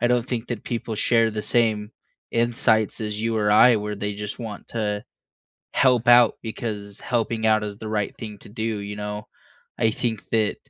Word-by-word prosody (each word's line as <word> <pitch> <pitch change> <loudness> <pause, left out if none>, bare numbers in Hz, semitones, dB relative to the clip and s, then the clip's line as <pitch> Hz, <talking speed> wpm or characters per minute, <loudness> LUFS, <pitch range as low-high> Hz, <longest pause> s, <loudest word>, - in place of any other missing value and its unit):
I 120 - +3
don't 125 -1 +2
think 120 -2 -3
that 120 -3 -4
people 115 -2 -3
share 115 +1 +3
the 110 - -3
same 110 -3 +1 0.4
insights 115 -2 +1
as 105 -1 -3
you 115 -1 0
or 105 -1 +2
I 115 +3 +7
where 105 0 -3
they 105 0 -3
just 105 0 -5
want 110 -4 -7
to 105 -2 -2 0.7
help 125 -2 +3
out 120 -1 +7
because 105 -3 -5
helping 115 -2 -1
out 110 -1 +4
is 105 -1 -5
the 110 0 -6
right 105 -2 -1
thing 105 -2 -7
to - - -14
do, 110 +1 -5
you 105 -2 -3
know? 105 0 -5 0.5
I 110 - +3
think 110 -2 -3
that, 110 -2 +2
110 Hz, 190 wpm, -24 LUFS, 105-115 Hz, 0.7 s, I